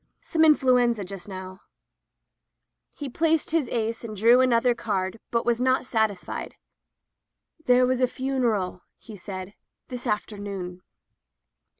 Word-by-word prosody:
"Some 320 -2 +1
influenza 250 -7 +4
just 195 0 -8
now/' 185 0 -8 1.4
He 290 - -5
placed 320 +4 +1
his 315 -6 +1
ace 225 -1 -2
and 215 -2 -7
drew 235 +5 +6
another 245 -1 +3
card, 205 -2 -2
but 235 -1 0
was 240 0 +1
not 260 +1 +2
satisfied. 220 -6 -2 1.1
"There 250 0 +5
was 255 0 0
a 255 - +4
funeral," 240 -9 -1 0.2
he 220 - -12
said, 185 0 -7 0.4
"this 250 -1 -6
afternoon." 200 -4 -4
230 Hz, 120 wpm, -25 LUFS, 200-255 Hz, 1.4 s, drew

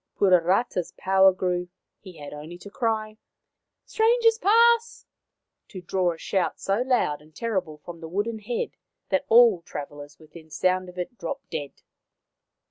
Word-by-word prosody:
Puarata' 185 +3 +3
s 175 - -5
power 190 0 +5
grew. 180 -1 -2 0.3
He 185 -4 -13
had 145 -1 -9
only 155 +4 -9
to 200 +3 -12
cry, 220 -3 -2 0.3
" - - -60
Strangers 455 0 +3
pass! 470 +2 +3 0.3
" - - -60
to 190 - -8
draw 180 0 0
a - - -13
shout 190 +2 -2
so 195 +4 0
loud 245 - 0
and 155 0 -21
terrible 190 -9 -3
from 165 +2 -11
the 160 - -8
wooden 210 +5 -2
head 225 +3 -3 0.4
that 285 - 0
all 230 -6 +6
travellers 145 -1 -9
within 160 0 -15
sound 185 +3 0
of 180 - -14
it 210 +6 -6
dropped 170 - -6
dead. 145 -3 -6
185 Hz, 160 wpm, -25 LUFS, 165-230 Hz, 0.4 s, all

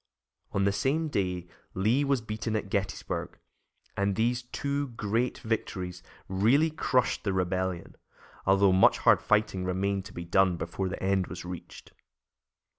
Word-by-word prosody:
On 100 - +1
the 100 - +3
same 140 +10 0
day 90 - -1 0.3
Lee 110 +9 +2
was 140 -3 +1
beaten 110 0 -3
at 105 -2 -3
Gettysburg, 100 -1 -3 0.6
and 100 0 0
these 120 +3 +1
two 140 +3 -2
great 115 0 -1
victories 90 -5 -3 0.3
really 120 +12 +3
crushed 130 -4 +1
the 100 - 0
Rebellion, 95 -1 -2 0.5
although 95 0 +5
much 95 - +5
hard - - +4
fighting 105 -3 +1
remained 95 +1 -1
to - - -10
be 85 - -6
done 90 0 +3
before 85 +4 -3
the 95 - -6
end 95 -1 +1
was 85 +2 -7
reached. 90 -1 -9
100 Hz, 145 wpm, -29 LUFS, 95-115 Hz, 0.6 s, although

